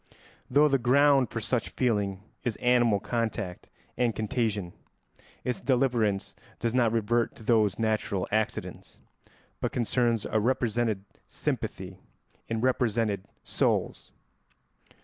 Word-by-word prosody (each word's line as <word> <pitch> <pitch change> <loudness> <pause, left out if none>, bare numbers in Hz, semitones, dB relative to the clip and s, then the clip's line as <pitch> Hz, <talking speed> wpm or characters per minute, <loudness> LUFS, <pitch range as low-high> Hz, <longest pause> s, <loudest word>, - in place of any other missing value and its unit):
Though 145 +4 +5
the 135 -2 +2
ground 135 +1 +4
for 115 - -3
such 115 +1 -1
feeling 100 -6 -1 0.2
is 120 -3 -1
animal 120 -4 +3
contact 110 -6 -3 0.3
and 120 -3 +1
contagion, 110 -4 -1 0.7
its 125 - -2
deliverance 120 -6 +1 0.2
does 115 0 -1
not 120 -3 +3
revert 115 +1 +1
to 115 - -13
those 105 -3 +3
natural 110 -3 0
accidents, 110 0 -3 0.6
but - - -1
concerns 120 -2 +1
a 110 - +1
represented 115 -3 0 0.2
sympathy - - -4 0.5
in 115 -1 -2
represented 115 -5 +1 0.2
souls. - - -1
115 Hz, 110 wpm, -28 LUFS, 105-125 Hz, 0.7 s, Though